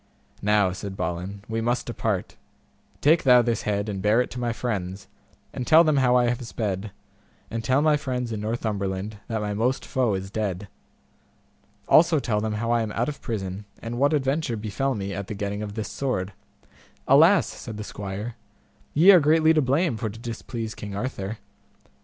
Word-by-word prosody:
Now, 105 -2 +3
said 95 +1 -6
Balin, 90 +3 -4
we 115 0 -2
must 120 +2 0
depart, 110 -5 -2 0.7
take 160 +3 +5
thou 125 -2 +6
this 115 -2 0
head 100 0 -1
and 100 -2 -3
bear 105 +4 +3
it 125 - 0
to 125 - -6
my 120 -1 -1
friends, 95 -5 -4 0.5
and 125 - -4
tell 160 +1 +7
them 155 -3 +2
how 125 -2 +4
I 125 -1 +4
have 120 +1 -1
sped, 105 -2 -3 0.6
and 115 0 -3
tell 130 +5 +2
my 155 -1 +4
friends 125 -4 -3
in 110 -2 -3
Northumberland 105 -2 -3
that 110 -2 -2
my 105 -1 -2
most 120 +6 0
foe 125 -6 +1
is 95 +1 -5
dead. 100 -2 -3 1.2
Also 165 0 +6
tell 110 -5 -1
them 110 0 -2
how 115 +2 -1
I 120 -1 +3
am 110 -1 -3
out 120 +5 0
of 150 - -7
prison, 100 -2 -4
and 120 +1 -5
what 145 +3 +3
adventure 135 -3 0
befell 110 +6 -2
me 100 -1 -4
at 100 0 -5
the 105 - -5
getting 100 +1 -3
of 105 -1 -6
this 110 -1 -4
sword. 105 -8 -2 0.7
Alas! - - +6
said 110 - -8
the 105 - -5
squire, 105 +3 -6 0.6
ye 170 +7 +8
are 185 - +8
greatly 160 +1 +4
to 155 - +3
blame 140 0 +1
for 110 -1 -2
to 105 - -10
displease 115 -1 -5
King 100 -1 -7
Arthur. 110 -2 -4
110 Hz, 190 wpm, -25 LUFS, 100-125 Hz, 1.2 s, ye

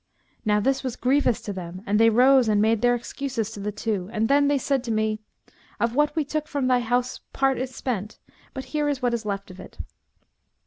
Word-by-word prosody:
Now 210 -1 +3
this 270 +5 +1
was 255 -2 -3
grievous 255 -2 +2
to 205 - -5
them 180 0 -7
and 210 0 +1
they 225 0 +6
rose 255 +2 +5
and 210 -1 +3
made 220 +1 +2
their 245 0 +4
excuses 240 -2 -4
to 210 - -8
the 205 +1 -3
two 205 -3 -3
and 220 0 0
then 285 +1 +4
they 285 0 +3
said 270 -1 0
to 235 - -2
me, 215 0 0 0.6
'Of 235 0 +1
what 295 +4 +2
we 310 -2 0
took 305 +1 -3
from 285 -4 -2
thy 255 -1 +3
house 245 +1 -1
part 270 -1 +1
is 260 0 -4
spent, 215 -5 -4 0.4
but 265 - -5
here 300 -1 +1
is 275 -3 -3
what 245 -1 +2
is 230 -2 -3
left 200 -1 -4
of 185 - -13
it.' - - -12
240 Hz, 225 wpm, -24 LUFS, 215-270 Hz, 0.6 s, they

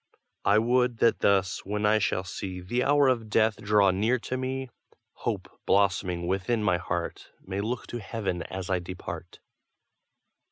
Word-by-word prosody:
I 100 - +5
would 120 +1 +2
that 115 - +3
thus, 95 -2 +2
when 105 +2 -2
I 110 +1 +4
shall 95 -2 0
see 95 0 -5
The 120 +8 -1
hour 145 0 +4
of 115 -4 +1
death 110 0 +3
draw 100 -2 +4
near 110 +7 +2
to 125 +1 -4
me, 130 0 -3 0.4
Hope, - - -3 0.2
blossoming 95 -3 +2
within 95 +5 0
my 90 -4 +3
heart, 85 -1 -4 0.2
May 95 +1 -3
look 115 +2 -3
to 120 - -5
heaven 95 -4 -3
as 95 0 -5
I 90 - +2
depart. 90 +1 -7
105 Hz, 160 wpm, -27 LUFS, 95-120 Hz, 0.4 s, I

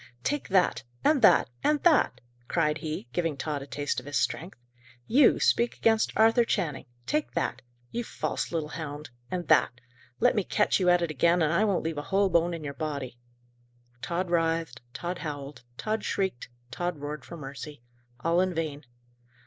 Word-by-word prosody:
"Take 290 0 -1
that! 190 -3 +2 0.2
and 300 -3 +4
that! 215 - +6 0.2
and 300 0 +3
that!" 305 - +4 0.3
cried 155 -2 +1
he, 155 -6 -5
giving 165 -5 -1
Tod 145 0 -3
a 135 - -8
taste 145 -1 -2
of 125 - -13
his 145 - -1
strength. 175 +6 -2 0.5
"You 265 +3 +5
speak 235 0 +2
against 225 -1 +3
Arthur 225 +2 +5
Channing! 165 -11 -2 0.2
take 300 0 -1
that! 125 - -1 0.3
You 240 - -2
false - - -3
little 160 -3 -2
hound! 150 -3 -6 0.2
and 180 -1 -3
that! 125 - +4 0.4
Let - - +4
me 205 - +2
catch 210 +3 +2
you 180 -1 +3
at 175 -1 +4
it 165 - -1
again, 170 +4 +3
and 155 +1 +2
I 200 +6 +3
won't 200 -4 +1
leave 160 -2 -2
a 145 - -8
whole 195 0 +3
bone 170 +1 +2
in 160 - -8
your 140 -1 -4
body!" 140 -6 -5 0.8
Tod 175 +1 -2
writhed; 165 -5 0
Tod 175 +6 -4
howled; 145 -3 -6 0.2
Tod 215 0 -2
shrieked; 190 -13 -2 0.2
Tod 175 +4 -2
roared 145 +1 -6
for 170 - -9
mercy. 140 -2 -8 0.4
All 170 +4 +2
in 185 -1 0
vain. 150 -3 -3
165 Hz, 180 wpm, -28 LUFS, 145-190 Hz, 0.8 s, that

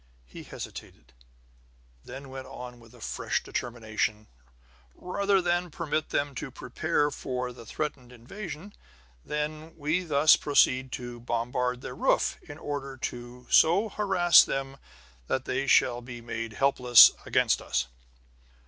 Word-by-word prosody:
He - - -11
hesitated, 60 +2 -10 0.9
then 135 +2 -9
went 130 0 -8
on 125 -1 -9
with 120 +1 -17
fresh - - -2
determination: 110 -3 -3 0.7
"Rather 195 +1 0
than 175 0 0
permit 155 -1 -3
them 145 0 -1
to 130 - -6
prepare 145 +4 -1
for 125 -2 -4
the 115 -2 -13
threatened 135 -4 -5
invasion, 165 - -9 0.5
then, 155 +2 -4
we 160 +4 0
thus 155 -2 +5
proceed 130 -3 +2
to 120 -1 -6
bombard 125 +1 -2
their - - -7
roof, - - +1
in 145 - -8
order 140 -3 -5
to 120 0 -7
so 185 +7 +5
harass 190 -5 +5
them 135 0 -4 0.5
that 130 0 -1
they 135 +2 -2
shall 120 -1 +3
be 120 0 -9
made 115 -1 -5
helpless 125 -2 +7 0.2
against - - +2
us." - - -1
135 Hz, 130 wpm, -28 LUFS, 120-155 Hz, 0.9 s, helpless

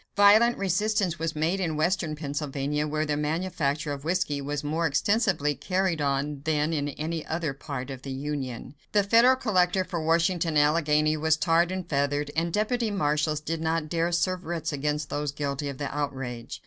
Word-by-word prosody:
Violent 215 +4 +6
resistance 195 -2 0
was 165 -1 -2
made 165 +5 0
in 165 -5 -1
western 165 -1 0
Pennsylvania, 145 0 -2
where 155 +1 -1
the 150 -1 0
manufacture 150 -1 -1
of 140 -1 -7
whiskey 160 -4 0
was 145 +1 -3
more 160 +3 0
extensively 170 -1 +1
carried 185 0 -1
on 140 0 -1
than 155 0 +1
in 145 -2 -1
any 155 +3 -4
other 160 -3 -2
part 135 -1 -6
of 130 -1 -7
the 135 - -8
Union. 135 -2 -4 0.2
The 205 -1 +4
federal 235 +5 +5
collector 190 -7 +2
for 175 -2 -4
Washington 165 0 +1
and 145 - +6
Allegheny 155 0 +2
was 160 +1 +2
tarred 170 +1 +2
and 185 -2 -4
feathered, 145 0 0
and 165 +1 0
deputy 220 +4 0
marshals 150 -5 0
did 160 +1 -3
not 160 -1 -1
dare 170 +1 0
serve 180 +1 0
writs 165 -1 -3
against 150 +1 -2
those 145 -1 -2
guilty 140 0 -3
of 140 - -6
the 140 0 -4
outrage. 135 -5 -4
155 Hz, 180 wpm, -27 LUFS, 145-175 Hz, 0.2 s, Violent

